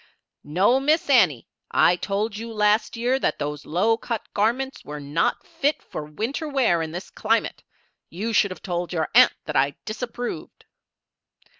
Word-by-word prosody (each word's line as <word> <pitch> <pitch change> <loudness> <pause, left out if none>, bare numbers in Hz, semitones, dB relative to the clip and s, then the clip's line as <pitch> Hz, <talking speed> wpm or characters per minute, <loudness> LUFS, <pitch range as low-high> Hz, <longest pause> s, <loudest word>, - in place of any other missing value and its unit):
"No, 190 - +3
Miss 300 +2 +2
Annie, 180 - +4 0.2
I 175 - +4
told 205 +4 -2
you 230 +2 -6
last 210 +1 +1
year 250 +3 +1
that - - 0
those 150 0 -5
low 210 +8 +2
cut 230 -1 -4
garments 260 +6 0
were 150 0 -7
not 145 +3 -1
fit 290 +2 -1
for 150 - -6
winter 225 - -4
wear 245 - +2
in 160 -1 -4
this 175 +3 -7
climate. 225 +1 0 0.5
You 215 +6 -4
should 200 -1 +4
have 185 -4 -9
told 175 -1 -3
your 160 -3 -1
aunt 250 +2 +7
that 150 - -5
I 140 +1 +2
disapproved." 240 +2 -6
210 Hz, 160 wpm, -24 LUFS, 165-240 Hz, 0.5 s, aunt